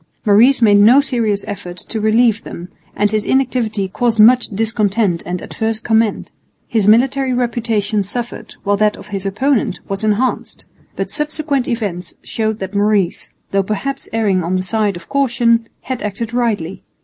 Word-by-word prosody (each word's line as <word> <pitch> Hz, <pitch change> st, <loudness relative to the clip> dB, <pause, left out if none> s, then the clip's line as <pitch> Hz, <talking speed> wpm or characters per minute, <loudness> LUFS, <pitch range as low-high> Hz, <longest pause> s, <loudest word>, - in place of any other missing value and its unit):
Maurice 235 Hz, +5 st, +5 dB
made 205 Hz, -2 st, +6 dB
no 230 Hz, +7 st, +7 dB
serious 230 Hz, -7 st, 0 dB
effort 180 Hz, -4 st, -7 dB
to 220 Hz, +4 st, -5 dB
relieve 220 Hz, 0 st, +2 dB
them, 175 Hz, +2 st, -9 dB, 0.3 s
and 205 Hz, 0 st, +1 dB
his 215 Hz, -1 st, 0 dB
inactivity 240 Hz, -6 st, 0 dB
caused 225 Hz, +3 st, -1 dB
much 240 Hz, +3 st, +6 dB
discontent 210 Hz, -3 st, 0 dB
and 180 Hz, 0 st, -4 dB
adverse 220 Hz, 0 st, -2 dB
comment. 225 Hz, -2 st, 0 dB, 0.4 s
His 220 Hz, -4 st, 0 dB
military 255 Hz, +4 st, +3 dB
reputation 225 Hz, -4 st, -1 dB
suffered, 235 Hz, +5 st, -6 dB
while 205 Hz, 0 st, +1 dB
that 210 Hz, 0 st, +1 dB
of -, -, -13 dB
his 195 Hz, -1 st, -3 dB
opponent 250 Hz, +6 st, 0 dB
was 195 Hz, +1 st, -4 dB
enhanced. 215 Hz, +4 st, -1 dB, 0.3 s
But -, -, -4 dB
subsequent 300 Hz, -3 st, -1 dB
events 205 Hz, -7 st, -4 dB
showed 220 Hz, -1 st, -2 dB
that 190 Hz, -1 st, -6 dB
Maurice, 200 Hz, -3 st, 0 dB, 0.2 s
though 195 Hz, -, +2 dB
perhaps 270 Hz, +8 st, -4 dB
erring 205 Hz, -5 st, +1 dB
on 175 Hz, +3 st, -1 dB
the 185 Hz, -, -1 dB
side 210 Hz, 0 st, 0 dB
of 175 Hz, -, -11 dB
caution, 235 Hz, -4 st, +1 dB
had 260 Hz, -1 st, -5 dB
acted 215 Hz, +3 st, -4 dB
rightly. 210 Hz, -8 st, -1 dB
220 Hz, 160 wpm, -17 LUFS, 200-240 Hz, 0.4 s, no